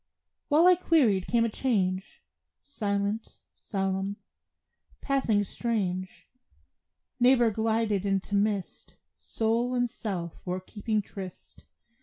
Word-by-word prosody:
While 310 Hz, +3 st, +5 dB
I 365 Hz, -, +8 dB
queried 270 Hz, -, +2 dB
came 230 Hz, -1 st, +3 dB
a -, -, 0 dB
change, 195 Hz, -6 st, -1 dB, 0.4 s
Silent, 205 Hz, -4 st, -2 dB, 0.2 s
solemn, 195 Hz, 0 st, -2 dB, 0.8 s
passing 250 Hz, -7 st, +1 dB
strange; 185 Hz, -4 st, -3 dB, 0.9 s
Neighbor 245 Hz, -2 st, +5 dB
glided 220 Hz, -2 st, 0 dB
into 195 Hz, 0 st, -1 dB
mist, 200 Hz, -1 st, -1 dB, 0.2 s
Soul 235 Hz, +3 st, 0 dB
and 245 Hz, 0 st, +2 dB
self 190 Hz, -8 st, -5 dB
were 180 Hz, 0 st, -2 dB
keeping 210 Hz, +3 st, -2 dB
tryst. 190 Hz, -2 st, -10 dB
210 Hz, 100 wpm, -28 LUFS, 195-235 Hz, 0.9 s, I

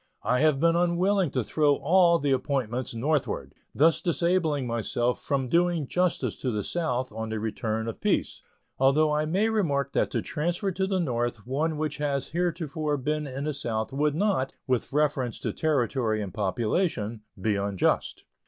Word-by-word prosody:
I 125 Hz, -, +2 dB
have 150 Hz, -3 st, +3 dB
been 165 Hz, +2 st, +3 dB
unwilling 175 Hz, +1 st, +2 dB
to 130 Hz, -2 st, -1 dB
throw 145 Hz, +5 st, +2 dB
all 170 Hz, +4 st, +4 dB
the 145 Hz, -3 st, 0 dB
appointments 130 Hz, -3 st, -1 dB
northward, 145 Hz, +4 st, -1 dB, 0.2 s
thus 160 Hz, +3 st, +4 dB
disabling 170 Hz, -5 st, +1 dB
myself 120 Hz, +1 st, -1 dB
from 135 Hz, -2 st, -1 dB
doing 170 Hz, +1 st, +2 dB
justice 180 Hz, +5 st, 0 dB
to 130 Hz, -, -2 dB
the 105 Hz, -3 st, -1 dB
South 130 Hz, -, -1 dB
on 110 Hz, +1 st, -5 dB
the 110 Hz, 0 st, -2 dB
return 110 Hz, +1 st, -2 dB
of 115 Hz, -, -6 dB
peace; -, -, 0 dB, 0.4 s
although 150 Hz, +3 st, +4 dB
I 150 Hz, +1 st, +1 dB
may 195 Hz, +7 st, +2 dB
remark 145 Hz, -, 0 dB
that -, -, +1 dB
to -, -, -2 dB
transfer 170 Hz, +6 st, -1 dB
to 190 Hz, +1 st, -1 dB
the 190 Hz, -1 st, 0 dB
North 120 Hz, -, -2 dB
one 150 Hz, +5 st, -1 dB
which 155 Hz, -1 st, -2 dB
has 140 Hz, -2 st, -1 dB
heretofore 160 Hz, -3 st, -1 dB
been 150 Hz, +2 st, -2 dB
in 135 Hz, +1 st, -5 dB
the 150 Hz, 0 st, -1 dB
South 115 Hz, -4 st, -3 dB
would 145 Hz, +1 st, +1 dB
not, 180 Hz, -8 st, 0 dB
with 125 Hz, -3 st, -1 dB
reference 140 Hz, -4 st, 0 dB
to -, -, -2 dB
territory 125 Hz, -7 st, 0 dB
and 100 Hz, -4 st, -5 dB
population, 110 Hz, -, -1 dB, 0.2 s
be 105 Hz, +2 st, +1 dB
unjust. 100 Hz, -1 st, 0 dB
145 Hz, 170 wpm, -27 LUFS, 120-165 Hz, 0.4 s, all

